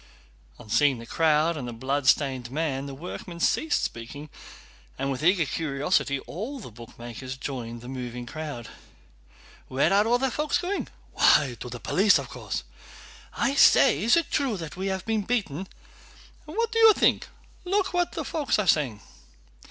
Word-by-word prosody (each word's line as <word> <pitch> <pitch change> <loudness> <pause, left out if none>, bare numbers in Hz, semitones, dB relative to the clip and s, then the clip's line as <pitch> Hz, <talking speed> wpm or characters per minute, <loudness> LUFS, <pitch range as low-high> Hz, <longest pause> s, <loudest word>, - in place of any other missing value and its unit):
On - - -13
seeing 135 +4 +3
the 115 - -9
crowd 160 +4 +2
and 135 -5 -5
the - - -5
bloodstained 130 0 +1
man 140 -1 -2
the 135 - -7
workman 170 +3 -8
ceased 315 - +1
speaking, 140 +6 -6 0.7
and 135 +1 -1
with 130 - -4
eager 175 -1 +4
curiosity 140 -2 0
all 235 - -6
the 205 - -10
bootmakers 120 +3 -9
joined 120 -4 -5
the 120 - -10
moving 125 -2 -6
crowd. 145 -4 -6 1.0
"Where 140 +7 +2
are 205 +2 +4
all 240 +1 +4
the 265 0 0
folks 300 +3 0
going?" 370 +3 -3 0.3
"Why, 135 -5 +4
to 125 - -7
the 120 - -7
police, 200 - +4
of 135 -3 -6
course!" 110 - -5 0.7
"I - - +1
say, 145 - +6
is 235 +8 +5
it 335 - -1
true 270 -8 0
that 165 -4 -7
we 190 +2 -3
have 190 -1 -3
been 225 -1 0
beaten?" 190 - -2 0.8
"And 310 +7 -8
what 460 0 +1
did 455 - 0
you 445 -1 +8
think? - - +2 0.4
Look 385 +1 0
what 355 -1 0
folks 295 -6 0
are 210 - 0
saying." 135 - +1
150 Hz, 165 wpm, -26 LUFS, 130-210 Hz, 1.0 s, you